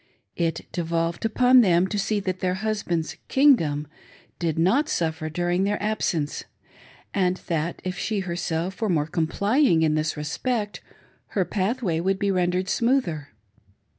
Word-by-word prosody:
It 165 Hz, -2 st, -1 dB
devolved 170 Hz, +2 st, -1 dB
upon 250 Hz, +3 st, +5 dB
them 180 Hz, -4 st, +4 dB
to 210 Hz, -, -1 dB
see 210 Hz, +1 st, 0 dB
that 185 Hz, -1 st, -3 dB
their 185 Hz, 0 st, 0 dB
husband's 190 Hz, -5 st, -2 dB
"kingdom" 170 Hz, -, +3 dB, 0.5 s
did 165 Hz, -3 st, -1 dB
not 240 Hz, -, +3 dB
suffer 160 Hz, -1 st, -1 dB
4uring 175 Hz, +3 st, 0 dB
their 205 Hz, +1 st, 0 dB
absence, 185 Hz, -8 st, -1 dB, 0.7 s
and 185 Hz, -2 st, +1 dB
that 165 Hz, 0 st, -2 dB
if 185 Hz, -1 st, -3 dB
she 215 Hz, -3 st, -1 dB
herself 175 Hz, +1 st, -3 dB
were 220 Hz, -, +1 dB
more 155 Hz, -5 st, +2 dB
complying 170 Hz, -, +2 dB
in 155 Hz, -1 st, +3 dB
this 155 Hz, 0 st, -1 dB
respect, 210 Hz, -, -2 dB, 0.6 s
her 190 Hz, -, +3 dB
pathway 195 Hz, -3 st, -1 dB
would 190 Hz, +3 st, +1 dB
be 200 Hz, 0 st, 0 dB
rendered 180 Hz, 0 st, 0 dB
smoother. 195 Hz, -, 0 dB
180 Hz, 140 wpm, -24 LUFS, 165-210 Hz, 0.7 s, upon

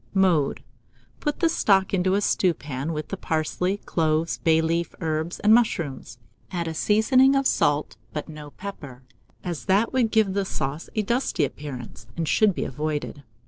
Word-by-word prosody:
Mode. 180 Hz, -7 st, +2 dB, 0.6 s
Put 295 Hz, +1 st, -2 dB
the 335 Hz, -, +5 dB
stock 195 Hz, -12 st, +2 dB
into 185 Hz, 0 st, +2 dB
a 205 Hz, -, +1 dB
stewpan, 150 Hz, -7 st, 0 dB
with 155 Hz, -1 st, -4 dB
the 195 Hz, -, -4 dB
parsley, 180 Hz, +4 st, -1 dB
cloves, 160 Hz, -3 st, 0 dB
bay 160 Hz, -1 st, +3 dB
leaf, 165 Hz, +1 st, -1 dB
herbs, 160 Hz, +1 st, -2 dB
and 210 Hz, +1 st, +5 dB
mushrooms; 160 Hz, -, 0 dB, 0.3 s
add 170 Hz, -2 st, -3 dB
a 160 Hz, -, -3 dB
seasoning 255 Hz, -, +4 dB
of 275 Hz, 0 st, +2 dB
salt, 145 Hz, -, +1 dB
but 150 Hz, -, -5 dB
no 150 Hz, -1 st, -9 dB
pepper, 145 Hz, -8 st, -9 dB, 0.4 s
as 175 Hz, -4 st, -5 dB
that 200 Hz, +6 st, +2 dB
would 250 Hz, -4 st, +2 dB
give 215 Hz, -3 st, +2 dB
the 200 Hz, 0 st, 0 dB
sauce 150 Hz, -4 st, -4 dB
a 215 Hz, -, +1 dB
dusty 235 Hz, -, 0 dB
appearance, 125 Hz, -5 st, -8 dB
and 165 Hz, -1 st, -1 dB
should 205 Hz, +3 st, +3 dB
be -, -, -2 dB
avoided. 150 Hz, +1 st, -4 dB
170 Hz, 165 wpm, -24 LUFS, 150-200 Hz, 0.6 s, the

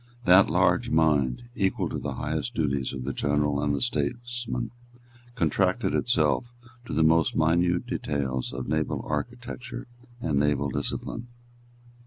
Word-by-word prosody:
That 95 Hz, 0 st, +7 dB
large -, -, +3 dB
mind, 75 Hz, -, +2 dB
equal 95 Hz, -4 st, 0 dB
to -, -, -3 dB
the -, -, -4 dB
highest 80 Hz, +11 st, -3 dB
duties 70 Hz, -6 st, 0 dB
of 65 Hz, -2 st, -5 dB
the 70 Hz, +1 st, -3 dB
general 75 Hz, +1 st, +1 dB
and 70 Hz, -1 st, +1 dB
the 70 Hz, -, -3 dB
statesman, 120 Hz, -, -2 dB, 0.6 s
contracted 80 Hz, -10 st, +1 dB
itself 120 Hz, -, +2 dB, 0.4 s
to -, -, -6 dB
the 80 Hz, +2 st, +3 dB
most 80 Hz, 0 st, +3 dB
minute 85 Hz, +2 st, +2 dB
details 65 Hz, -3 st, -2 dB
of 60 Hz, +1 st, -5 dB
naval 80 Hz, 0 st, -1 dB
architecture 120 Hz, -, -5 dB, 0.3 s
and 75 Hz, -11 st, 0 dB
naval 70 Hz, -1 st, +1 dB
discipline. 115 Hz, -, -3 dB
80 Hz, 135 wpm, -27 LUFS, 70-100 Hz, 0.6 s, That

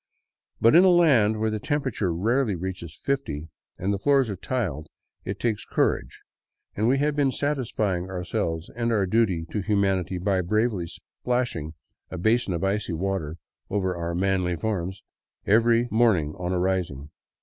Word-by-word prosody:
But 115 Hz, -, +5 dB
in 175 Hz, +3 st, +8 dB
a 190 Hz, -, +6 dB
land 135 Hz, -12 st, +4 dB
where 110 Hz, 0 st, 0 dB
the 110 Hz, -, -2 dB
temperature 130 Hz, -, -1 dB
rarely 110 Hz, +6 st, +1 dB
reaches 90 Hz, -2 st, -6 dB
fifty, 80 Hz, -, -2 dB, 0.3 s
and 100 Hz, +3 st, -1 dB
the 100 Hz, -, -2 dB
floors 135 Hz, -2 st, +3 dB
are -, -, -3 dB
tiled, 90 Hz, -, -3 dB, 0.4 s
it -, -, -4 dB
takes 115 Hz, -3 st, -1 dB
courage, -, -, -1 dB, 0.5 s
and 110 Hz, +2 st, +1 dB
we 130 Hz, +3 st, +3 dB
had 145 Hz, +1 st, +1 dB
been 140 Hz, -2 st, +2 dB
satisfying 110 Hz, -11 st, -1 dB
ourselves 90 Hz, -3 st, -3 dB
and 120 Hz, 0 st, 0 dB
our 105 Hz, -4 st, +2 dB
duty 95 Hz, -5 st, +1 dB
to 105 Hz, -, -1 dB
humanity 95 Hz, -3 st, 0 dB
by 95 Hz, +1 st, +1 dB
bravely 105 Hz, -1 st, 0 dB
splashing 115 Hz, -10 st, -3 dB, 0.3 s
a 90 Hz, -, -6 dB
basin 110 Hz, +2 st, +1 dB
of 85 Hz, -, -3 dB
icy 100 Hz, -1 st, 0 dB
water 85 Hz, -3 st, -2 dB, 0.3 s
over 95 Hz, -3 st, -1 dB
our 85 Hz, 0 st, -3 dB
manly 90 Hz, -1 st, +1 dB
forms 95 Hz, 0 st, -3 dB, 0.4 s
each 115 Hz, +3 st, +3 dB
morning 105 Hz, -10 st, +3 dB
on 90 Hz, -1 st, -3 dB
arising. 90 Hz, -6 st, -1 dB
100 Hz, 155 wpm, -25 LUFS, 90-115 Hz, 0.5 s, in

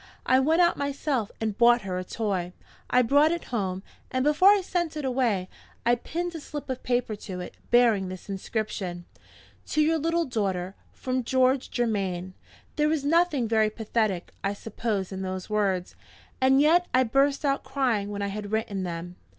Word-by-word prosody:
I 260 Hz, -, +4 dB
went 320 Hz, +6 st, +4 dB
out 345 Hz, -, +2 dB
myself 280 Hz, -5 st, -1 dB
and 220 Hz, -2 st, -2 dB
bought 240 Hz, -1 st, +5 dB
her 185 Hz, -1 st, -3 dB
a -, -, -4 dB
toy. 185 Hz, -3 st, -2 dB, 0.4 s
I 250 Hz, 0 st, +4 dB
brought 285 Hz, +6 st, +4 dB
it 340 Hz, -1 st, -2 dB
home, 190 Hz, -4 st, -2 dB, 0.3 s
and 255 Hz, 0 st, 0 dB
before 300 Hz, +7 st, +5 dB
I 410 Hz, -1 st, +5 dB
sent 345 Hz, -3 st, -2 dB
it 300 Hz, -, -3 dB
away, 240 Hz, -8 st, 0 dB, 0.4 s
I 240 Hz, -, +4 dB
pinned 345 Hz, +8 st, -3 dB
a 325 Hz, -, -5 dB
slip 295 Hz, -2 st, -6 dB
of 255 Hz, -, -4 dB
paper 245 Hz, -3 st, 0 dB
to 185 Hz, -3 st, -7 dB
it, 180 Hz, -, -7 dB, 0.2 s
bearing 230 Hz, -6 st, +4 dB
this 185 Hz, -1 st, -9 dB
inscription: 195 Hz, -3 st, -4 dB, 0.6 s
"To -, -, -1 dB
your 320 Hz, +1 st, +2 dB
little 330 Hz, +2 st, +1 dB
daughter, 195 Hz, -, -2 dB, 0.2 s
from 255 Hz, 0 st, -2 dB
George 260 Hz, +2 st, +2 dB
Germaine." 195 Hz, -6 st, -1 dB, 0.4 s
There 300 Hz, 0 st, +3 dB
is 300 Hz, -3 st, -1 dB
nothing 315 Hz, -5 st, +2 dB
very 220 Hz, -1 st, +3 dB
pathetic, 215 Hz, -4 st, -2 dB
I 195 Hz, +1 st, -1 dB
suppose, 210 Hz, -2 st, -3 dB
in 190 Hz, 0 st, -5 dB
those 185 Hz, +1 st, -5 dB
words. 195 Hz, -4 st, 0 dB, 0.5 s
And 265 Hz, +1 st, +5 dB
yet 335 Hz, +4 st, +4 dB
I 255 Hz, -, +5 dB
burst 275 Hz, +4 st, +2 dB
out 275 Hz, -1 st, +1 dB
crying 235 Hz, -8 st, 0 dB
when 205 Hz, -1 st, -4 dB
I 200 Hz, -, -1 dB
had 205 Hz, 0 st, -6 dB
written 220 Hz, -3 st, -1 dB
them. 175 Hz, 0 st, -5 dB
235 Hz, 180 wpm, -26 LUFS, 195-280 Hz, 0.6 s, bought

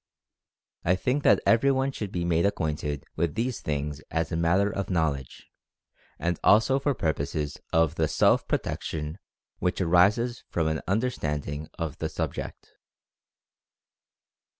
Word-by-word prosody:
I 90 Hz, -, +3 dB
think 130 Hz, +9 st, 0 dB
that -, -, +5 dB
everyone 135 Hz, +3 st, +3 dB
should 105 Hz, -7 st, -5 dB
be 85 Hz, -1 st, -2 dB
made 85 Hz, -1 st, +2 dB
acquainted 75 Hz, -6 st, -1 dB
with 85 Hz, -1 st, -1 dB
these 120 Hz, +2 st, -2 dB
things 75 Hz, 0 st, -3 dB
as 80 Hz, +2 st, -1 dB
a -, -, -1 dB
matter 90 Hz, +5 st, +2 dB
of 100 Hz, -1 st, -3 dB
knowledge, 75 Hz, -7 st, -1 dB, 0.7 s
and 85 Hz, 0 st, -1 dB
also 115 Hz, +6 st, +5 dB
for 140 Hz, 0 st, 0 dB
purposes 75 Hz, -, -2 dB
of 80 Hz, -1 st, +3 dB
the 80 Hz, -2 st, +1 dB
self -, -, +3 dB
protection 75 Hz, +3 st, -3 dB, 0.4 s
which 90 Hz, 0 st, 0 dB
arises 100 Hz, +8 st, +3 dB
from 85 Hz, -, 0 dB
an 80 Hz, 0 st, -1 dB
understanding 75 Hz, -, -2 dB
of 80 Hz, -3 st, -4 dB
the 80 Hz, -, -2 dB
subject. 80 Hz, -1 st, -5 dB
85 Hz, 130 wpm, -27 LUFS, 75-105 Hz, 0.7 s, that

